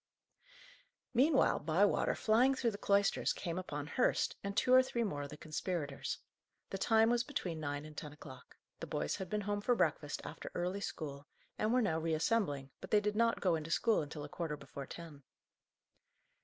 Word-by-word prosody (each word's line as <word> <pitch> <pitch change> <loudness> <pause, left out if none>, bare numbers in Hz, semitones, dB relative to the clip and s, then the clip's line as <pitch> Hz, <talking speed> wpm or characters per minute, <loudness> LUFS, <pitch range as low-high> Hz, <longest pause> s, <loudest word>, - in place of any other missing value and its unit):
Meanwhile, 270 +4 +4
Bywater, 170 +7 +2
flying 245 +5 +4
through 240 -3 +1
the 200 - -8
cloisters, 200 0 +2
came 170 -1 -3
upon 150 -6 -4
Hurst, 245 +11 +1
and 200 +1 -4
two 250 - +4
or 255 - +9
three 240 -2 -1
more 150 -10 -2
of 140 - -5
the 150 - -9
conspirators. 155 -2 -3 0.5
The 195 - -3
time 225 +2 +4
was 240 0 +2
between 180 - -3
nine 145 -1 -3
and 155 0 -11
ten 150 0 -6
o'clock. 130 -3 -13 0.2
The - - -5
boys 75 0 -1
had 190 - -5
been 210 0 -1
home 205 0 -2
for 245 +3 +2
breakfast - - 0
after - - -7
early 180 +3 -1
school, 145 -6 -5 0.3
and 215 - +1
were 250 0 +3
now 160 -6 +1
reassembling, 160 - 0
but - - -8
they 210 - +5
did 210 0 -1
not 230 +1 +2
go 180 -3 +3
into 160 0 -2
school 220 +5 +3
until 150 0 -6
a - - -5
quarter 155 -1 -4
before 140 -1 -8
ten. 160 -4 -9
180 Hz, 185 wpm, -35 LUFS, 150-220 Hz, 0.5 s, or